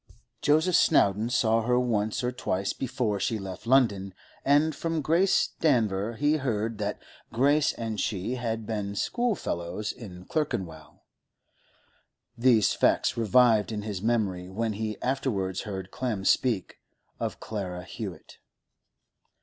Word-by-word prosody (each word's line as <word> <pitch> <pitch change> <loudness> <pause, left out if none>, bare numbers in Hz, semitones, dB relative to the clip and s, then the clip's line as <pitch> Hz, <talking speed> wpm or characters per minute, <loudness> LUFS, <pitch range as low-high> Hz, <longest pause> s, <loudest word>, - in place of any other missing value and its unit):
Joseph 160 +4 +3
Snowdon 105 - +3
saw 115 -2 +2
her 125 +2 +2
once 110 -1 0
or 125 - 0
twice 100 -6 -2
before 120 -5 -2
she 110 +3 0
left 95 +2 -8
London, 100 -8 +2 0.3
and 145 +2 +3
from 165 +1 -2
Grace 170 +6 +3
Danver 115 -7 +1
he 145 +5 +2
heard 115 -5 -2
that 105 0 -2 0.3
Grace 140 +5 +3
and 110 -2 -4
she 100 +3 -2
had 115 -3 -3
been 105 -2 -3
schoolfellows 105 - -2
in 90 -6 -11
Clerkenwell. 90 - -4 1.3
These 120 -3 +4
facts - - +2
revived 115 -1 +4
in 105 -1 -4
his 105 -4 -4
memory 100 -6 0
when 110 +3 -2
he 110 +1 -4
afterwards 110 -9 -1
heard 95 -2 -6
Clem 110 -7 -3
speak 115 -6 +1 0.4
of - - -3
Clara 90 -5 -5
Hewett. - - -8
110 Hz, 125 wpm, -27 LUFS, 100-130 Hz, 1.3 s, These